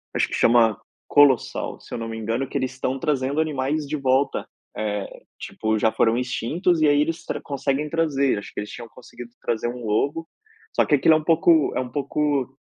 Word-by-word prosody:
acho - - +2
que - - -10
chama 115 -3 +4 0.3
Colossal, 140 -4 +3
se - - -13
eu - - -2
não 115 - -4
me 115 - -5
engano, 115 +4 -2
que 140 - -3
eles 130 -1 -2
estão 130 +1 -3
trazendo 140 +1 -1
animais 150 0 -1
de 155 - -2
volta, 135 0 0 0.3
eh, 105 -2 -4 0.2
tipo, 110 0 -2
já 110 +1 +2
foram 115 +1 +2
extintos 155 - 0
e 155 - +5
aí 145 0 +4
eles 165 +2 -2
tra - - -3
conseguem 140 +1 -2
trazer, 140 -7 +1
acho 100 - -10
que - - -5
eles 105 - -6
tinham 120 -1 -9
conseguido 120 -1 -12
trazer 120 0 -1
um 120 -1 -6
lobo 145 +10 -1 0.5
só - - +4
que 150 - +3
aquilo 150 +4 +4
é - - +5
um 155 - -5
pouco 165 -1 +4
é - - 0
um 125 - -3
pouco, 140 0 -1
135 Hz, 210 wpm, -23 LUFS, 120-150 Hz, 0.5 s, e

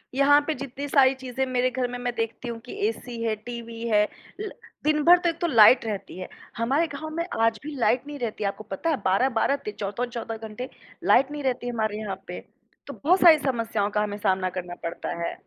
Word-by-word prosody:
यहाँ 285 +1 +6
पे 315 - +1
जितनी 275 +2 -6
सारी 270 -1 +5
चीज़ें 260 0 -3
मेरे 255 0 +1
घर 250 0 -1
में 245 - -4
मैं 245 0 -2
देखती 230 +2 -3
हूँ 230 -1 -5
कि - - -8
एसी 230 +1 -5
है, 220 -1 0
टीवी 230 +1 -8
है, 210 -1 +3 0.3
ल 425 - -3 0.3
दिन 300 0 +2
भर 350 +3 +8
तो 350 -1 +1
एक 330 - -5
तो 345 - +1
लाइट 230 -2 +7
रहती 205 -4 -5
है। 185 - -5 0.3
हमारे 275 +8 +1
गाँव 305 +2 -6
में 335 - 0 0.2
आज 225 -1 +2
भी 300 -1 -6
लाइट 250 0 +2
नहीं 290 -1 -7
रहती 220 -3 -3
है - - +1
आपको 205 +2 -5
पता 210 - -3
है? 300 - +1
12-12 235 +7 +2
ते 210 - -2
14-14 230 +2 -3
घंटे 245 +4 -7 0.3
लाइट 270 +3 +4
नहीं 295 -1 -5
रहती 250 -2 -1
है 245 - -2
हमारे 215 -2 -1
यहाँ 200 -3 -4
पे। 180 - -6 0.5
तो - - -6
बहुत 360 +6 +4
सारी 330 -3 +9
समस्याओं 230 -6 -1
का 210 0 +1
हमें 205 -1 -3
सामना 190 -2 +1
करना 180 -1 -6
पड़ता 170 - -4
है। - - -2
240 Hz, 225 wpm, -25 LUFS, 215-275 Hz, 0.5 s, सारी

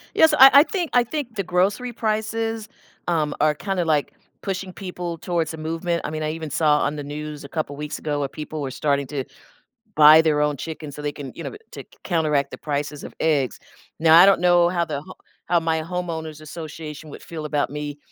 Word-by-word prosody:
Yes, 320 0 +6
so, 300 - +1
I 270 +1 +11
I - - +5
think 350 -2 -3
I 245 - +5
think 245 -2 -5
the 195 - -1
grocery 195 +7 0
prices, 225 0 -2 0.4
um, 155 -4 +1
are 155 0 +4
kinda 185 +2 -2
like 150 -3 +1 0.3
pushing 190 -1 -4
people 180 -3 -5
towards 165 -1 -2
a - - -7
movement, 165 +2 -2
I - - -2
mean, 155 0 -3
I 155 - -1
even 160 -1 -6
saw 150 0 +3
on 145 - 0
the 145 - -5
news 150 +1 -6
a 140 - -10
couple 155 -3 -3
weeks 150 +1 -5
ago 150 -2 -2
where 140 -1 -2
people 155 +1 -6
were 135 - -3
starting 140 0 0
to 140 -2 -3 0.7
buy 155 +1 +9
their 155 -2 +2
own 150 -1 +1
chicken 155 +1 -7
so 150 - -8
they 145 0 -2
can, 140 -3 -8
you - - -7
know, - - -4 0.2
to - - -8
c - - -28 0.2
counteract 150 -5 +1
the - - -8
prices 145 -1 -3
of - - -9
eggs, 145 -5 +1 0.4
now, 160 0 +7
I 185 - +9
don't 195 -2 +5
know 175 -1 +5
how 175 -1 0
the 150 -4 -4
ho 185 +3 -12 0.3
how 170 0 +3
my 160 -1 0
homeowners 160 -3 -5
association 155 -1 -8
would - - -10
feel 160 -2 -7
about 150 -1 0
me, 145 0 -5
160 Hz, 220 wpm, -23 LUFS, 150-180 Hz, 0.7 s, I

